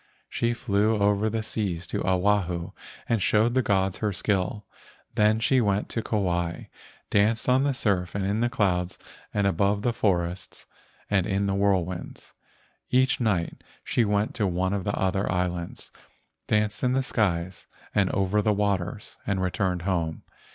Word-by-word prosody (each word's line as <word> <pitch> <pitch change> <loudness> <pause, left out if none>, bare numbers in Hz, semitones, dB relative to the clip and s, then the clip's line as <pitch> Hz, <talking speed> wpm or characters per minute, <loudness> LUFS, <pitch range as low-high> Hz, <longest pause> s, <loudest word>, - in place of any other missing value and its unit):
She 120 0 0
flew 105 -1 +1
over 105 +1 +2
the 110 0 -2
seas 95 -6 -2
to - - -3
Oahu 90 -2 +1 0.4
and 115 -3 +1
showed 110 +5 +3
the 130 - +3
gods 95 -4 0
her 105 -2 0
skill. 100 +1 -1 0.5
Then, 105 +1 +3
she 130 +2 +3
went 100 -2 0
to 115 - -2
Kauai, 85 -6 -1 0.5
danced 110 +3 +2
on 130 +1 +4
the 140 -2 +1
surf 100 -8 0
and 100 -1 -1
in 100 +3 0
the 120 +1 +2
clouds 90 -6 0 0.3
and 100 -1 0
above 100 +2 +1
the 120 - +1
forests 90 -4 -1 0.4
and 95 -3 +1
in 100 0 0
the 100 - 0
whirlwinds. 95 -3 -1 0.6
Each 130 +1 +3
night 100 -8 -1 0.2
she 120 - +1
went 105 0 0
to 105 - 0
one 95 +1 0
of 100 -2 -2
the 100 - -1
other 95 0 0
islands, 90 -1 -3 0.6
danced 105 0 +1
in 125 0 +2
the 135 0 +1
skies 90 -7 -1 0.3
and 100 -3 +2
over 100 +1 +1
the 105 0 +2
waters, 100 -1 -2
and 100 -1 0
returned 90 -1 -1
home. 85 -4 -1
100 Hz, 160 wpm, -26 LUFS, 90-105 Hz, 0.6 s, on